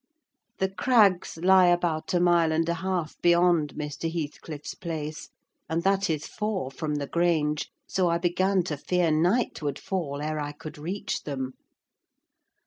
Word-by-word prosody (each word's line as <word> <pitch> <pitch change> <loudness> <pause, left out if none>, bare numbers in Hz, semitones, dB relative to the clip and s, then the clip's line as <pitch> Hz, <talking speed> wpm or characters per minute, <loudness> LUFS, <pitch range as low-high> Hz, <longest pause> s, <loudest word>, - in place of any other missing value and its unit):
The 190 - 0
Crags 195 -4 +3
lie 185 +2 +5
about 175 -2 +1
a - - +4
mile 170 -2 +4
and 160 +1 +1
a 170 - +1
half 170 -2 -3
beyond 170 -4 +3
Mr. 150 +2 -4
Heathcliff's 150 -2 -5
place, 155 -2 -5 0.4
and 165 +1 -1
that 195 0 +2
is 155 -1 -1
four 210 -10 -3
from 150 +1 -3
the 145 -1 -2
Grange, 155 -2 +1 0.2
so 185 -2 +1
I 170 - +2
began 185 +2 +1
to 155 -4 -3
fear 175 +2 +1
night 175 +11 +1
would 145 -2 -2
fall 160 -7 -3
ere 155 +1 -2
I 145 0 -4
could 150 0 -10
reach 180 +7 -3
them. 130 -3 -4
170 Hz, 155 wpm, -27 LUFS, 150-180 Hz, 0.4 s, lie